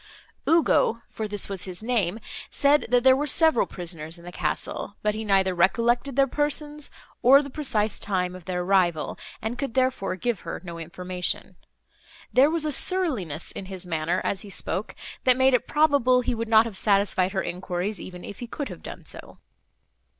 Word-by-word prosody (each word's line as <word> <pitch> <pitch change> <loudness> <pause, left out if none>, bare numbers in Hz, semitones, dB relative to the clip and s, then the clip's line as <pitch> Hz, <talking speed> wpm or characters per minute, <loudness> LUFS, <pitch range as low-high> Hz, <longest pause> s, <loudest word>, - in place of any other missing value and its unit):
Ugo, 310 -8 +3
for 220 - -4
this 205 -1 0
was 195 -2 -3
his 185 +2 -8
name, 225 -4 0 0.3
said, 290 +1 +3
that 245 0 +3
there 260 0 +7
were 290 +2 -1
several 320 -2 +5
prisoners 165 -2 -7
in 170 - -15
the 175 - -8
castle, 180 +4 -3
but 210 0 +1
he 220 +1 -4
neither 195 -3 +2
recollected 235 +8 +2
their 275 0 +5
persons, 295 +1 -1 0.3
nor 275 +4 +7
the 280 - -8
precise 220 -8 -1
time 180 -3 -1
of 180 -2 -12
their 180 -1 -2
arrival, 175 -4 +1 0.2
and 225 +3 -3
could 275 -4 -4
therefore 255 -8 0
give 220 +2 -2
her - - -6
no 170 -2 -7
information. 180 +2 -3 0.8
There 265 +4 +6
was 325 -1 0
a 305 - 0
surliness 260 - +2
in 190 - -8
his 190 -1 -7
manner, 165 +1 -1
as 195 - -1
he 205 - -10
spoke, 195 +2 -4 0.3
that 255 -1 +4
made 260 0 +4
it 250 - +1
probable 285 -5 +3
he 250 - -1
would 230 -1 -4
not 220 0 +6
have 220 -4 -4
satisfied 195 -2 +2
her 190 - -1
enquiries, 185 +3 -4
even 180 -1 -9
if 200 - -9
he 240 - -6
could 285 +4 -5
have - - -9
done - - -9
so. - - -9
215 Hz, 185 wpm, -25 LUFS, 185-260 Hz, 0.8 s, there